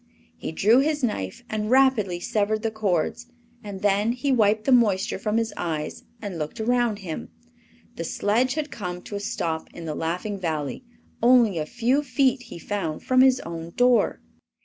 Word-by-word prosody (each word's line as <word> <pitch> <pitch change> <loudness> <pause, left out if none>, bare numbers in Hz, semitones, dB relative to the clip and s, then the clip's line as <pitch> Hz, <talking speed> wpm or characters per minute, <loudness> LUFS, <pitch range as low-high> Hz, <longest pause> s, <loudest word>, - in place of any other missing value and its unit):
He 80 - -5
drew 215 +9 +4
his 295 0 0
knife 95 - -2
and 215 0 -2
rapidly 245 -9 +3
severed 215 +2 0
the 225 - 0
cords, 215 +1 -1 0.4
and 200 -2 -7
then 205 +3 +2
he 255 +3 -1
wiped 215 -3 +3
the 270 - +1
moisture 210 -6 +3
from 215 0 0
his 230 0 -1
eyes 155 -3 -4 0.2
and 190 -5 -5
looked 155 +9 -5
around 240 -1 +1
him. 160 -3 -5 0.7
The 165 - -3
sledge 235 - +1
had 305 -2 -3
come 180 -4 -5
to 205 - -7
a - - -2
stop 165 -5 -3
in 170 - -7
the 155 - -3
Laughing 180 +6 -3
Valley, 155 - -3 0.4
only 235 -7 +5
a 155 - -3
few 245 - +1
feet, 275 -3 +1
he - - -8
found, 170 -4 -4
from 255 0 +4
his 260 -1 +5
own 165 0 -7
door. 245 -1 +3
210 Hz, 175 wpm, -25 LUFS, 175-245 Hz, 0.7 s, only